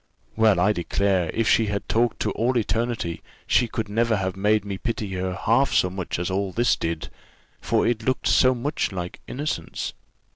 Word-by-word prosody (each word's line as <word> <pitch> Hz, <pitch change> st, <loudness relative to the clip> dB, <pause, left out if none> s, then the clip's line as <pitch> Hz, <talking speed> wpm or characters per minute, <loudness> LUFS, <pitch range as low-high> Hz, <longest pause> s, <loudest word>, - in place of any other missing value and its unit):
Well, 110 Hz, -4 st, +4 dB
I 100 Hz, +4 st, +4 dB
declare, 95 Hz, -1 st, 0 dB
if 115 Hz, -1 st, 0 dB
she 110 Hz, -, +4 dB
had 100 Hz, 0 st, -3 dB
talked 115 Hz, 0 st, +1 dB
to -, -, 0 dB
all 125 Hz, +2 st, 0 dB
eternity, 115 Hz, -6 st, -1 dB, 0.2 s
she 120 Hz, -, +3 dB
could 110 Hz, -1 st, -3 dB
never 115 Hz, +2 st, +1 dB
have 95 Hz, -2 st, -2 dB
made 105 Hz, +1 st, +2 dB
me 100 Hz, -2 st, -4 dB
pity 115 Hz, -3 st, -3 dB
her 95 Hz, 0 st, -2 dB
half 120 Hz, +7 st, +2 dB
so 90 Hz, -, +3 dB
much 95 Hz, -2 st, -4 dB
as 90 Hz, +2 st, -2 dB
all 95 Hz, 0 st, -1 dB
this 120 Hz, +5 st, +2 dB
did, 80 Hz, -1 st, -3 dB, 0.5 s
for -, -, +1 dB
it 120 Hz, -1 st, +1 dB
looked 130 Hz, +3 st, -1 dB
so 130 Hz, 0 st, +5 dB
much 140 Hz, +2 st, -2 dB
like 90 Hz, -2 st, -5 dB
innocence. 150 Hz, +4 st, -4 dB
105 Hz, 185 wpm, -24 LUFS, 95-115 Hz, 0.5 s, so